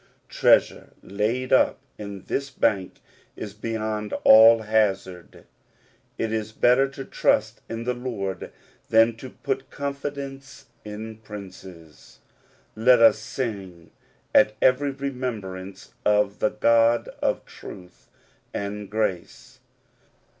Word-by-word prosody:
Treasure - - +2
laid 110 +6 -2
up - - +4 0.2
in 100 -2 -7
this 140 +6 -3
Bank 100 -7 -1 0.3
is 105 -2 -7
beyond 110 -1 -4
all. 110 +1 +8
hazard. 100 -5 -1 0.7
"It 110 -1 -2
is 110 -1 -3
better 125 +4 +4
to 135 0 -9
trust 110 +2 0
in 115 0 -4
the 125 +1 -1
Lord 115 -7 -5 0.4
than 115 +1 +4
to 130 +2 -9
put 135 - -4
con 140 0 -4
fidence 140 -1 -7 0.2
in 110 +1 -8
princes. 95 -6 -12 0.6
Let 120 +3 +5
us 115 -1 +6
sing 100 -8 -6 0.4
at 105 - +5
every 135 +2 +3
remem 130 -4 -4
brance 95 0 -9
of 105 -1 +2
the 110 - +2
God 115 +2 +3
of - - -1
truth 90 -1 -13 0.5
and 100 0 -5
grace. 105 -5 -4
110 Hz, 115 wpm, -24 LUFS, 100-125 Hz, 0.7 s, all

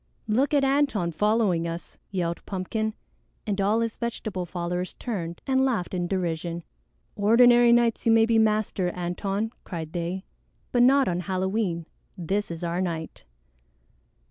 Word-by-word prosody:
"Look 250 +6 +2
at 280 - +3
Antone 270 -10 +2
following 205 -2 +1
us," 170 +1 -7
yelled 170 -3 -2
Pumpkin, 215 +3 -2 0.5
and 205 -2 -1
all 210 +4 +2
his 230 -1 -2
vegetable 215 -6 -3
followers 175 +1 -3
turned 170 -8 -5
and 265 0 +2
laughed 230 -10 0
in 175 -1 -1
derision. 170 -2 -2 0.5
"Ordinary 240 +3 +6
nights 235 -1 +3
you - - +6
may 225 0 +6
be 225 -1 +3
master, 215 -4 +1
Antone," 195 +5 -2
cried 160 -3 -6
they, 175 +2 -3 0.5
"but 245 - +3
not 270 +2 +5
on 175 -1 0
Halloween. 185 -1 -1 0.3
This 195 +4 -1
is 170 0 -6
our 170 +1 -1
night." 165 -3 -4
195 Hz, 145 wpm, -26 LUFS, 175-225 Hz, 0.5 s, Ordinary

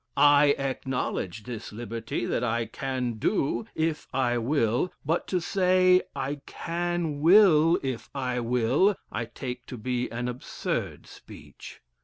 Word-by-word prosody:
I 145 0 +6
acknowledge 130 -7 -3
this 115 -2 -7
liberty, 115 +1 -4
that - - -1
I 120 -1 0
can 125 -1 -3
do, 140 - 0
if 160 -1 -1
I 125 -2 +1
will, 125 +4 +1
but 165 +4 0
to 185 - 0
say, 185 0 +3
I 140 +1 -3
can 170 -3 -2
will 165 -1 +6
if 130 -3 -4
I 125 -2 -1
will, 125 - +2 0.2
I 115 - -2
take 125 +2 -7
to 125 - -7
be 125 +2 -2
an 120 +2 -3
absurd 125 +1 -4
speech." - - -13
130 Hz, 135 wpm, -27 LUFS, 120-160 Hz, 0.2 s, I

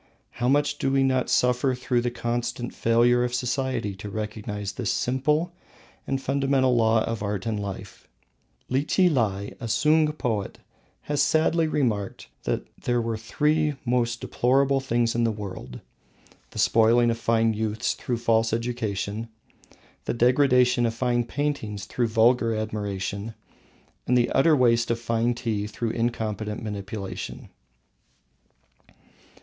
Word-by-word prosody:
How 120 - -2
much 145 +2 +2
do 135 - 0
we 135 0 +3
not 130 -1 +1
suffer 125 +1 +2
through 125 -1 0
the 120 - 0
constant 120 0 -3
failure 120 +2 +3
of 125 0 -1
society 125 -3 -1
to 105 +1 -7
recognise 105 -1 -4
this 110 -4 -2
simple 150 +7 0 0.5
and 135 -1 -1
fundamental 135 -1 +1
law 110 -1 +3
of 115 -2 -3
art 100 -2 -3
and 110 -2 -1
life; 100 -2 -7 0.6
Lichilai, 130 - +1
a 115 - -5
Sung 155 +6 +3
poet, 115 -9 -3 0.4
has 145 -1 -1
sadly 160 +3 +2
remarked 115 -10 -2 0.2
that - - -1 0.2
there 120 0 +1
were 115 -1 -1
three 150 +7 0
most 120 -1 0
deplorable 135 +2 +2
things 120 -3 0
in 120 - +1
the 115 - +2
world: 95 - -7 0.7
the - - -13
spoiling 115 +1 +4
of 115 - -3
fine 115 -1 +2
youths 110 +1 -1
through 120 - -3
false 115 -1 +1
education, 115 -2 -3 0.8
the - - -1
degradation 125 -1 +4
of 115 - -3
fine 120 -1 0
art 140 -8 -1
through 120 +4 -1
vulgar 115 +1 +3
admiration, 105 0 -4 0.7
and 125 - +3
the 120 - +2
utter 155 +3 +4
waste 115 -3 +3
of 115 0 0
fine 115 +1 0
tea 110 -3 -2
through 110 +2 -3
incompetent 110 -3 -2
manipulation. 105 -1 -6
120 Hz, 135 wpm, -25 LUFS, 110-130 Hz, 0.8 s, spoiling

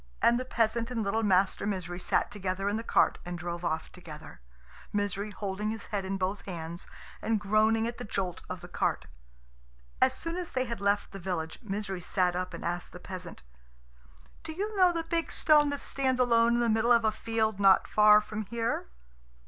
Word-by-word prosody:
And 235 +1 +4
the 255 - -4
peasant 230 -1 0
and 235 -3 -2
little 215 +3 0
Master 195 -1 +2
Misery 180 -3 -3
sat - - 0
together 195 -1 -3
in 205 - +1
the 225 - -2
cart - - +2
and 175 0 -5
drove 175 0 -5
off 160 -2 -2
together, 155 - -11 0.5
Misery 205 0 -1
holding 205 +1 -3
his 220 -1 -5
head 200 -2 -1
in 195 +1 -2
both 190 +2 -2
hands 170 -1 -6 0.3
and 220 -1 +1
groaning 215 +2 +3
at 235 0 -4
the - - -5
jolt 190 -4 -3
of - - -5
the - - -9
cart. - - -1 1.0
As 260 0 +4
soon 330 +4 -4
as 360 -2 -5
they 255 0 +1
had 235 -4 -5
left 200 0 +1
the 195 - -8
village, 170 -3 -4
Misery 195 -4 -4
sat 180 0 +1
up 180 0 -2
and 170 - -7
asked 175 +1 -3
the 180 - -9
peasant, 180 - -8 1.0
"Do 320 - -6
you 415 +5 -3
know 365 -2 +5
the 335 -1 -2
big 330 0 -1
stone 300 -2 +5
that 285 0 -2
stands 260 -2 0
alone 235 -1 +4
in 240 - +2
the 235 - +2
middle 225 +2 +2
of 235 -1 +5
a 215 - +4
field 220 -1 -1
not 195 -1 +5
far 210 0 +6
from 210 -1 -6
here?" 230 - -2
210 Hz, 200 wpm, -29 LUFS, 185-235 Hz, 1.0 s, far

